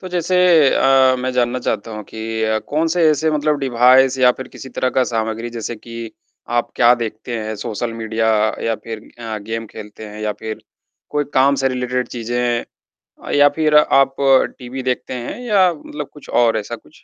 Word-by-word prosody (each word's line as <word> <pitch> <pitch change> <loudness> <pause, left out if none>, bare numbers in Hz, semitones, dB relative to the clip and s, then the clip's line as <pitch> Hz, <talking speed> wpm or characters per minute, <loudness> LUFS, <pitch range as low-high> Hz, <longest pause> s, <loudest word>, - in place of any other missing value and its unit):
तो 185 - -7
जैसे 180 0 0 0.4
अ, 135 -1 +4
मैं 130 +1 -2
जानना 125 0 0
चाहता 115 -1 -2
हूँ 105 - -6
कि 110 +1 -5
अ, 110 0 +1
कौन 155 +8 -1
से 170 +1 +1
ऐसे 155 +1 +1
मतलब 150 -1 0
डिवाइस 130 0 +4
या 125 -1 +6
फिर 130 - -9
किसी 135 - -10
तरह 130 -1 -1
का 130 - +2
सामग्री 115 0 -3
जैसे 115 +1 -4
कि 115 0 -8 0.5
आप 120 - -2
क्या 120 0 +6
देखते 115 +1 -5
हैं 110 0 -4
सोशल 115 +2 -4
मीडिया 110 0 -1 0.4
या 115 - +1
फिर 115 -1 -5 0.2
अ, 110 -2 -5
गेम 115 +2 -5
खेलते 110 0 -10
हैं 105 0 -9
या 105 0 -1
फिर 110 0 -6 0.5
कोई 145 0 0
काम 135 +2 +4
से 135 - +3
रिलेटेड 125 0 -2
चीज़ें 120 0 -2 0.7
या 145 0 +7
फिर 155 -1 +2
आप 135 -2 +4 0.4
टीवी 130 +1 -6
देखते 130 0 -2
हैं 125 - -5
या 200 -7 +3
मतलब 150 -1 -8
कुछ 150 - -15 0.2
और 115 -1 +2
ऐसा 110 +3 -5
कुछ? - - -22
120 Hz, 185 wpm, -19 LUFS, 115-135 Hz, 0.7 s, या